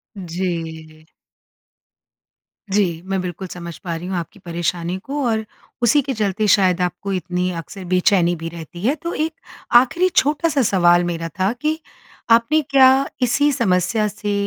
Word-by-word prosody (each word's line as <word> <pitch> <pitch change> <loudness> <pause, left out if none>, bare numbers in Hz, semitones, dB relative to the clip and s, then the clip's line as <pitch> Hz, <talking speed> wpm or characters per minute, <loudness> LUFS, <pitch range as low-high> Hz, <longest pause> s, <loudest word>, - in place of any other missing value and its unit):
जी। 165 -4 -5 1.6
जी, 190 -5 +1
मैं 195 0 -1
बिल्कुल 180 +1 -5
समझ 170 -2 -8
पा 170 -3 -3
रही 170 +2 -6
हूँ 190 - -3
आपकी 170 +5 -6
परेशानी 175 0 -3
को 280 +1 -3
और, 220 -1 0 0.4
उसी 265 +5 +4
के 270 0 -3
चलते 210 -1 0
शायद 185 -2 +3
आपको 180 +2 -2
इतनी 180 0 -1
अक्सर 190 +3 -9
बेचैनी 180 -1 +3
भी 165 0 -6
रहती 170 +1 -10
है। 250 +7 +2
तो 340 +2 -5
एक 315 +1 -1 0.4
आख़िरी 295 +10 +5
छोटा-सा 295 0 +2
सवाल 175 -5 +4
मेरा 165 -1 -3
था 190 +2 +2
कि 310 +1 0 0.5
आपने 235 +7 +4
क्या 270 -1 +5
इसी 280 +4 +3
समस्या 210 -3 +1
से 210 0 -4
190 Hz, 150 wpm, -20 LUFS, 175-245 Hz, 1.6 s, आख़िरी